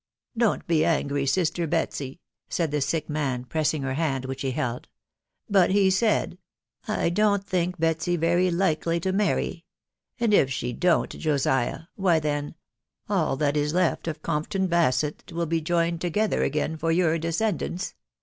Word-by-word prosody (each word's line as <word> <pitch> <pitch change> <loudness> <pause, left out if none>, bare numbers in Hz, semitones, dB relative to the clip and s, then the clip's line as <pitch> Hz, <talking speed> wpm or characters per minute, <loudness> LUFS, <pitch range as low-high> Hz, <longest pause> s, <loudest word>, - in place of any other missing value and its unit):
don't 230 -2 +1
be 160 -2 +2
angry, 145 -4 0
sister 170 +1 +1
Betsy," 145 -3 -2 0.3
said 165 -4 -1
the 150 -1 0
sick 155 +2 -1
man, 140 -5 -2
pressing 155 +1 0
her 130 -1 -2
hand 135 -3 -1
which 135 0 -5
he 135 - -1
fheld, 125 -1 -3 0.6
"but 195 -4 +4
he 195 0 +4
said, 215 +3 +1 0.5
f - - -1
I - - +1
don't 200 +2 +2
think 180 -2 -1
"Betsy 165 +2 +1
*very 175 +2 +2
likely 170 -1 +1
to 185 +3 -1
•marry; 195 -3 0 0.6
and 230 -3 +2
if 135 -9 +5
jshe 125 -3 -3
don't, 175 -2 +2
Josiah, 135 -5 0
why, 180 -5 +2
then, 145 0 -2 0.5
all 180 -9 +1
that 145 0 +1
is 150 +1 0
lefVof 165 -3 0
Compton 170 +5 -1
Basett 155 -4 +1
wiEL 170 -1 -3
be 165 +1 0
Joined 170 +1 0
together 205 +5 0
agom 150 +2 -1
tor 165 +2 0
your 165 -1 +2
^fesceadaniB 175 +2 -2
165 Hz, 160 wpm, -25 LUFS, 150-180 Hz, 0.6 s, if